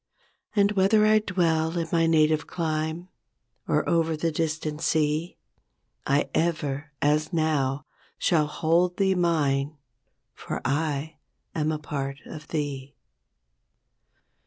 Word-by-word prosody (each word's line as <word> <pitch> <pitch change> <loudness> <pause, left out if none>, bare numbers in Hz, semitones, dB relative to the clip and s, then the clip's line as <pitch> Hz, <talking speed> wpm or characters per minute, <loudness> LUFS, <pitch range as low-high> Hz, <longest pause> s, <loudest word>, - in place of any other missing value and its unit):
And 200 -1 +4
whether 210 +2 +4
I 215 0 +5
dwell 170 -4 0
in 165 -1 -1
my 165 -1 +3
native 155 -1 +3
clime, 160 +1 -3 0.6
Or - - +1
over 165 -1 +1
the 165 +1 0
distant 155 -1 -2
sea, 155 +1 0 0.7
I 140 +1 +2
ever, 150 -3 -1
as 150 +2 +2
now, 150 -4 0 0.3
shall 155 -3 +2
hold 170 +4 +1
thee 195 -1 +3
mine. 150 -5 +1 0.6
For - - -5
I 150 +2 -1 0.4
am 155 -1 0
a 155 - -1
part 140 -2 -4
of 155 -1 -9
thee. 140 -3 -4
160 Hz, 115 wpm, -26 LUFS, 150-170 Hz, 0.7 s, I